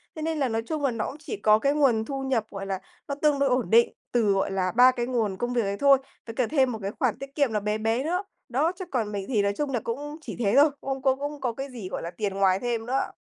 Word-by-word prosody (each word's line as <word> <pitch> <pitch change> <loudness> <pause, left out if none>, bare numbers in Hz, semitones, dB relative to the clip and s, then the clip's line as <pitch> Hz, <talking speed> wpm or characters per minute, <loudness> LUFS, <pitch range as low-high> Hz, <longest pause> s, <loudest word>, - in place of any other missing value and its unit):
Thế 310 - -6
nên 320 -1 -1
là 265 -3 +1
nói 225 0 -1
chung 305 0 -3
là, 270 - +2
nó 225 -2 -2
cũng 290 - -7
chỉ 405 +7 -5
có 215 - +4
cái 280 +3 +2
nguồn 245 -7 +3
thu 270 -1 -4
nhập, 250 -5 0
gọi 195 -1 -6
là, 190 -1 -2 0.3
nó 280 - -2
tương 295 -2 +3
đối 275 -1 +3
ổn 250 -7 +1
định 235 +1 +5 0.2
từ, 225 -4 +3
gọi 195 0 0
là, 185 -1 0
3 250 +2 +8
cái 240 -1 -2
nguồn 225 -6 -1
công 240 +2 -2
việc 240 - +2
ấy 200 0 -2
thôi, 280 -1 +6 0.3
với 225 - -6
cả 250 -3 +1
thêm 265 -4 +2
một 220 - -5
cái 195 +1 -3
khoản 250 -4 +1
tiết 275 0 -9
kiệm 280 -6 +2
là 210 - +2
bé 210 +1 -1
bé 225 +4 0
nữa, 360 +5 -1 0.3
đó, 290 +8 +2
chứ 370 0 -8
còn 225 -5 -1
mình 200 -1 -3
thì 220 -6 +2
nói 200 0 +1
chung 290 -2 -1
là 240 - 0
cũng 290 +6 -4
chỉ - - -7
thế 210 -2 +1
thôi, 295 +2 +7
cũng - - -12
không 270 -1 -2
có 265 -1 +3
cũng 290 0 -5
có 245 -3 -1
cái 270 +3 -6
gì, 215 -7 -7
gọi - - -4
là, 170 - -5
tiền 200 +2 -3
ngoài 195 -1 +3
thêm 235 -2 -2
nữa. 265 +2 -1
245 Hz, 305 wpm, -26 LUFS, 215-280 Hz, 0.3 s, 3